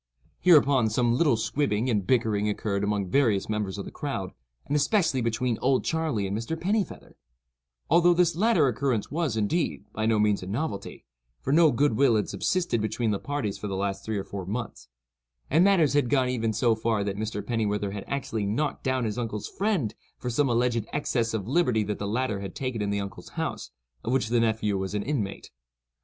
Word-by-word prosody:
'" - - -34
Hereupon 140 -9 +5
some 120 +2 +2
little 130 -2 +3
squibbing 115 -1 0
and 105 -6 0
bickering 110 -4 +2
occurred 100 -1 -2
among 100 -3 -1
various 115 -8 +2
members 105 -3 -2
of 100 - -5
the - - -8
crowd, 115 -11 -4 0.3
and 145 - -1
especially 150 - +2
between 115 0 -1
"Old 130 0 +2
Charley" 160 -11 0
and 95 +1 -2
Mr. 115 +9 -3
Pennifeather—although 65 - -1
this 175 -1 +3
latter 185 -6 +3
occurrence 125 -2 -1
was, 150 -7 -1
indeed, 155 +11 -1
by 110 0 -1
no 110 -1 +3
means 105 -1 +2
a 90 - -7
novelty, 115 +1 -4 0.3
for 135 - -1
little 160 -1 +6
good 140 +1 +2
will 135 -4 +4
had 105 -2 +1
subsisted 175 -11 0
between 110 +1 -1
the 100 - -1
parties 140 -9 -3
for 105 - -4
the 95 - -3
last 100 0 -2
three 110 -1 -2
or 100 - -2
four 100 0 -6
months; 115 - -5 0.6
and 160 +5 +5
matters 185 -8 +4
had 145 -4 +2
even 125 -3 +1
gone 115 -1 0
so 115 +2 +3
far 110 -1 0
that 100 -1 -2
Mr. 105 -1 -4
Pennifeather 105 -3 -1
had 100 -1 -5
actually 115 -6 -2
knocked 145 +9 -1
down 130 -2 0
his 110 +2 -2
uncle's 110 -3 -3
friend 190 - -1 0.2
for 125 - -4
some 140 +3 +2
alleged 120 -1 +1
excess 120 -5 0
of 100 -2 -3
liberty 125 -7 +2
that 105 0 -3
the 100 - -3
latter 110 -1 -1
had 100 0 -7
taken 130 -5 -3
in 100 - -1
the 100 0 0
uncle's 100 -1 -7
house, - - -3 0.3
of 115 - -2
which 125 -4 +1
the 120 0 +3
nephew 110 -3 +1
was 95 +1 -3
an 105 - -1
inmate. 120 -9 -3
115 Hz, 200 wpm, -27 LUFS, 105-140 Hz, 0.6 s, little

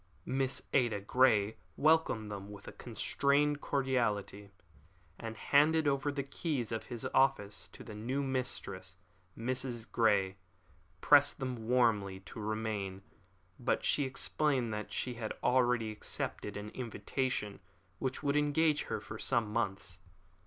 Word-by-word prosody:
Miss 135 0 -1
Ada 120 -6 +3
Grey 110 -1 +3 0.2
welcomed 155 -9 +3
them 100 0 -6
with 100 -1 -11
a - - -6
constrained 140 +5 +1
cordiality, 115 -7 0 0.7
and 110 -1 -6
handed 150 +4 +4
over 140 +1 +1
the 140 -1 -2
keys 140 -3 -2
of 115 - -2 0.3
office 105 -9 +2
to - - -12
the 110 - -9
new 125 +7 -2
mistress. 125 -8 -3 0.4
Mrs. 125 -1 -2
Grey 100 -4 +2 0.6
pressed 145 0 +6
her 135 - -2
warmly 115 -5 +1
to 95 +4 -10
remain, 105 -3 -3 0.6
but 120 - 0
she 145 - +2
explained 130 -2 0
that 105 0 -5
she 125 - -2
had 115 -2 -4
already 125 -3 +3
accepted 105 -1 -3
an 105 +1 -6
invitation 115 -2 -3 0.4
which 130 +3 -2
would 140 0 +1
engage 150 +1 +2
her - - -2
for - - -8
some 110 -3 +1
months. 95 -5 -2
120 Hz, 130 wpm, -33 LUFS, 105-135 Hz, 0.7 s, pressed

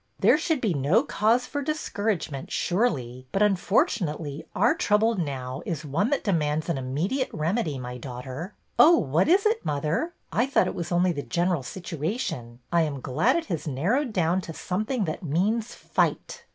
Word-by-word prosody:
There 300 - +5
should 320 -4 0
be 215 -6 +1
no 150 - +3
cause 235 -1 +2
for 285 +3 -3
discouragement, 205 - -2
surely, 130 - -1
but, 200 - +2
unfortunately, 175 -6 0
our - - +4
trouble 225 -9 +2
now 135 - -3
is 160 -2 -4
one 165 - 0
that 285 - 0
demands 155 -5 0
an 145 - 0
immediate 165 - -1
remedy, 160 - -1
my 125 -1 -6
daughter." 130 - -7
" - - -22
Oh, 335 +2 +8
what 155 +5 +2
is 385 +4 +4
it, 440 +1 +2
mother? 155 - -1 0.2
I 240 +4 +2
thought 275 - +3
it - - -2
was 170 -1 -5
only 175 +1 +3
the 145 -4 -3
general 175 0 0
situation. 155 - -4 0.2
I 170 - +5
am 150 -4 -1
glad 150 - +1
it 340 - -1
has 170 -5 -4
narrowed 205 - 0
down 180 -1 +1
to 165 - -7
something 215 +4 -1
that 155 +3 -4
means 205 +9 0
fight." - - -1
175 Hz, 175 wpm, -26 LUFS, 145-225 Hz, 0.2 s, Oh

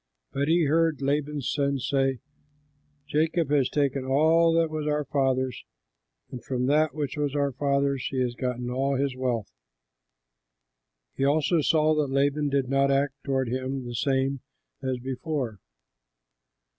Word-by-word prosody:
But 140 +1 -1
he 170 +1 +3
heard 160 +1 +2
Laban's 145 0 -1
sons 140 -3 -1
say, 135 -3 +1 0.9
"Jacob 160 +1 0
has 140 -3 +3
taken 140 -2 0
all 160 +5 +4
that 165 -1 +2
was 155 -1 -3
our 150 0 0
father's, 130 -5 0 0.7
and 125 -3 -7
from 125 -1 -2
that 150 +1 +2
which 145 -2 -3
was 145 -1 -1
our 140 -1 +1
father's 140 0 0
he 130 - -2
has 125 -1 0
gotten 125 -1 -3
all 135 +2 0
this 135 -1 -1
wealth." 125 -5 -2 1.6
He - - -1
also 155 +4 +2
saw 155 +1 +3
that 150 -2 0
Laban 145 +2 +1
did 140 -2 0
not 135 +1 +2
act 140 +1 +1
toward 135 -3 -1
him 130 +1 -3
the 120 - -6
same 135 +2 0 0.4
as 130 -1 -2
before. 130 - -4
140 Hz, 145 wpm, -26 LUFS, 130-150 Hz, 1.6 s, all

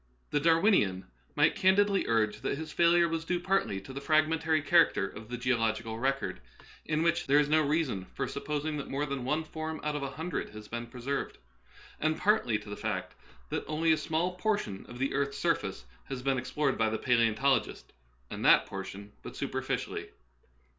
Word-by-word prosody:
The 145 - +2
Darwinian 160 - +3 0.3
might - - +4
candidly 195 +1 +3
urge 110 -2 +1
that - - -1
his 155 0 -6
failure 170 +1 +4
w^as 165 0 -2
due 175 +1 -1
partly 185 - 0
to 130 - -10
the 140 - -5
fragmentary 155 +1 +2
character 160 - +4
of 110 +3 -11
the 125 - -4
geolog 115 -3 +1
ical 115 0 -6
record, 135 +1 -1 0.5
in 155 0 0
which 170 0 +1
there 140 +2 +5
is 150 -1 +4
no 155 +1 +4
reason 145 - 0
for - - -1
sup 140 - -6
posing 150 +1 -2
that 140 - -6
more 140 +2 -1
than 140 -3 -4
one 150 +4 0
form 160 0 -5
out 150 0 -1
of 150 - -2
a 140 - -3
hundred 160 +4 -4
has 105 0 -9
been 120 +1 -5
preserved, 125 +4 -4 0.6
and 155 +1 +1
partly 185 - +2
to 105 0 -11
the - - -4
fact - - -3 0.4
that - - -2
only 160 +1 +2
a - - +6
small 160 +3 -1
portion 180 - -2
of 120 - -10
the 135 +2 -1
earth's 140 0 -1
surface - - -1 0.2
has 125 -2 -6
been 135 -1 +1
explored 140 +1 -1
by 110 -1 +3
the 110 - -1
palaeontologist, 120 +2 +2 0.5
and - - -5
that - - +6
por 95 -1 -5
tion 100 +2 -9
but - - -9
superficially. - - -3
140 Hz, 195 wpm, -30 LUFS, 120-160 Hz, 0.6 s, a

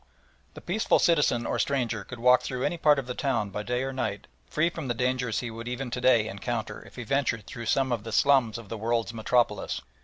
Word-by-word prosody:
The - - -9
peaceful 210 +5 +2
citizen 150 -8 +3
or - - -1
stranger 120 -6 0
could 120 +4 -9
walk 125 +2 +5
through 125 0 -4
any - - 0
part 150 -2 +5
of 135 - -2
the 125 - -4
town 115 -7 -1
by 105 - -3
day 125 +4 -1
or 135 0 -3
night 105 -6 -3 0.2
free 155 +2 +1
from 160 -5 -6
the 120 - -1
dangers 125 -1 0
he 120 -2 -5
would 115 +1 -7
even 125 0 -4
to 125 - -3
day 120 -4 +4
encounter 110 +3 -4
if - - -16
he 125 - -6
ventured 115 -4 0
through 115 -2 -7
some 135 +2 +2
of 115 -3 -1
the 115 - -6
slums 125 -2 +3
of 115 -3 -10
the 110 +2 -6
"World's 115 +1 -1
Metropolis." 115 -2 0
120 Hz, 235 wpm, -27 LUFS, 115-135 Hz, 0.2 s, walk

